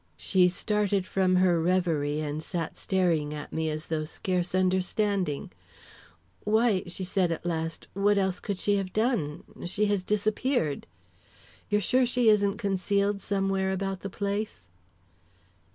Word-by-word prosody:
She 180 -2 +3
started 205 0 0
from 185 -1 +2
her 180 -2 +4
reverie, 160 -4 +1
and 150 0 -3
sat 165 -1 -4
staring 165 -6 0
at 150 - -8
me 160 0 0
as 155 +1 -3
though 160 -1 -2
scarce 180 +3 -2
understanding. 185 - 0 0.9
"Why," 215 -2 +3
she 175 +2 -2
said 180 -1 +1
at 165 - -4
last, 165 -1 -3
"what 205 +1 +2
else 190 -2 0
could 200 -3 -3
she 205 +2 +2
have 190 -2 -3
done? 215 - 0 0.2
She 200 +4 +1
has 200 - 0
disappeared 210 - 0 0.4
" - - -27
"You're 210 0 +2
sure 250 +6 +3
she 245 -2 +3
isn't 205 -1 +3
concealed 200 0 0
somewhere 195 -1 0
about 195 0 -2
the 195 - -5
place?" 200 - -3
190 Hz, 145 wpm, -28 LUFS, 170-205 Hz, 0.9 s, her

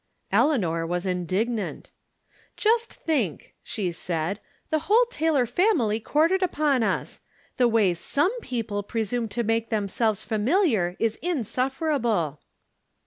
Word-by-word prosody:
Eleanor 175 - +2
was 175 +2 -2
indignant. 190 +5 -2 0.3
" - - -47 0.3
Just 460 +2 +2
think," 255 - -2
she 190 -5 -3
said, 170 +3 -3 0.2
" - - -40
the 310 - +2
whole 465 +4 +6
Taylor 315 - +2
family 245 - +2
quartered 325 - +2
upon 300 -7 +2
us! 220 - -1 0.4
The 250 - +4
way 220 -6 +3
some 285 - 0
peo 245 - -3
ple 205 -1 -3
presume 225 +2 -2
to 220 +3 -2
make 225 +1 0
themselves 215 0 0
familiar 220 - +1
is 225 -1 -1
insuf 265 - -1
ferable 225 - 0
230 Hz, 135 wpm, -25 LUFS, 200-295 Hz, 0.4 s, whole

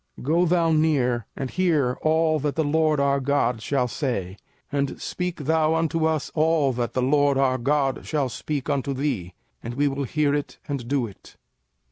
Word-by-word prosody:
05:005:027 - - -10
Go 175 +2 +4
thou 165 -1 +2
near, 135 -8 +2
and 135 -2 -4
hear 155 -9 +1
all 155 0 +2
that 145 0 -2
the 160 - +1
LORD 155 0 +2
our 140 0 +2
God 130 -4 0
shall 125 +1 0
say: 120 - -3 0.4
and 140 -1 -1
speak 180 -3 -4
thou 160 +1 +2
unto 165 0 0
us 155 -3 -1
all 155 -3 +2
that 120 -1 -2
the 130 - 0
LORD 145 +1 +3
our 130 -1 +2
God 135 +1 0
shall 145 -4 -1
speak 135 +3 -4
unto 140 -1 -1
thee; 120 -11 -2 0.3
and 120 +1 -6
we 145 +2 +2
will 140 0 -2
hear 145 +2 +1
it, 145 -1 -3
and 135 -5 -4
do 135 -2 +1
it. 100 -4 -14
140 Hz, 185 wpm, -24 LUFS, 130-155 Hz, 0.4 s, Go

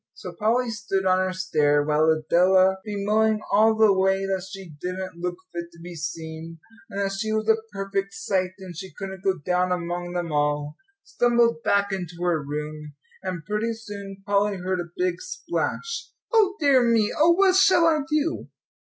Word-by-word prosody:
So 180 - -8
Polly 230 +6 +1
stood 195 -3 -2
on 185 0 +4
her 185 0 0
stair 150 -6 +2
while 155 +1 +2
Adela, 185 +4 +4
bemoaning 215 +1 +1
all 220 +2 +5
the 220 -2 +5
way 190 0 +2
that 190 -1 -2
she 195 -1 -9
didn't 180 -1 -5
look 180 0 -2 0.2
fit 170 0 -4
to 170 - -16
be 175 +1 -9
seen, 160 +1 -6 0.3
and 200 - -5
that 195 -1 0
she 205 +3 -3
was 215 0 -1
a 220 0 +3
perfect 195 0 -3
sight, 185 -2 -1
and 185 -3 -10
she 190 +2 -8
couldn't 190 +2 -8
go 190 -1 +1
down 180 +3 0
among 175 0 -3
them 175 -2 -3
all, 145 0 0 0.3
stumbled 235 -1 +2
back 200 -1 +1
into 180 -3 -4
her 170 -3 +1
room. 150 +1 -6 0.3
And 185 -4 -5
pretty 210 +4 -1
soon 200 -3 -9
Polly 200 0 +1
heard 185 0 -2
a 175 -1 -5
big 180 -1 -1
splash. 460 0 -3 0.2
"O 410 -4 +4
dear 280 -4 +5
me 230 -3 +2
oh, 330 +3 +5
what 380 +1 +4
shall 380 -3 +5
I 320 -2 +4
do?" 305 +2 -1
190 Hz, 180 wpm, -24 LUFS, 175-215 Hz, 0.3 s, all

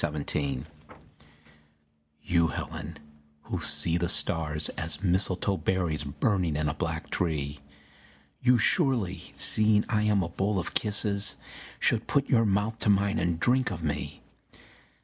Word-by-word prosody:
THE - - +2
APPEAL 70 -3 -2 1.6
You, 85 -2 +2
Helen, 75 0 -6 0.5
who - - -4
see 85 0 +2
the 85 -1 -1
stars 75 -1 0
As 80 +1 -2
mistletoe 95 +1 +2
berries 85 -6 -1
burning 90 - 0
in 75 0 0
a 75 - -1
black 80 -1 -4
tree, 75 -4 -2 0.8
You 125 0 +4
surely, 110 - +1
seeing 105 -1 +3
I 105 -2 +1
am 105 -2 +2
a 85 - -4
bowl 100 +4 -1
of 85 - -3
kisses, 105 -1 +1 0.4
Should 115 - +1
put 140 -1 +1
your 115 -3 +3
mouth 105 +3 0
to 105 - 0
mine 100 +2 +2
and 85 -1 -1
drink 125 +3 +2
of 85 -3 -6
me. 75 -2 -4
95 Hz, 140 wpm, -28 LUFS, 80-105 Hz, 1.6 s, You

